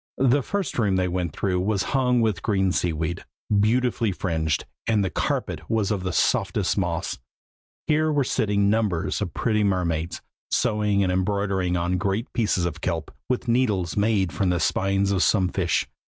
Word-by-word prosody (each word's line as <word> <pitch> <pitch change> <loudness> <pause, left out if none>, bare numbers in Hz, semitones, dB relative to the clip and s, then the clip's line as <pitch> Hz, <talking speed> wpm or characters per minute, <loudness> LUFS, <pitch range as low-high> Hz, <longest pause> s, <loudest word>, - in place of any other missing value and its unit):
The 135 +2 +3
first 195 0 -3
room 100 -4 +2
they 90 0 +1
went 90 -2 -2
through 90 +2 -1
was 100 0 0
hung 125 -3 +3
with 105 -6 0
green 95 -3 +1
sea 90 -1 0
weed, 80 +2 -3 0.4
beautifully 115 0 +2
fringed, 80 -5 -1 0.2
and 105 -3 +2
the 95 - -2
carpet - - -2
was 110 -2 +1
of 95 -3 -1
softest - - +1
moss. - - -2 0.7
Here 155 +1 +2
were 145 -2 +2
sitting 100 -4 +1
numbers 100 -4 0
of 95 -5 -4
pretty 105 -3 +1
mermaids, 85 -4 -1 0.3
sewing 105 -2 +1
and 90 - +1
embroidering 95 -1 0
on 90 +1 0
great 100 +5 -2
pieces 105 -6 +1
of 85 - -4
kelp, 85 -3 -3 0.2
with 125 0 -1
needles 110 -8 +1
made 100 -3 +1
of 95 - +1
the 90 -1 +1
spines 100 +2 +1
of 95 -3 +1
some 95 -3 +3
fish. 90 -2 0
100 Hz, 170 wpm, -24 LUFS, 90-110 Hz, 0.7 s, The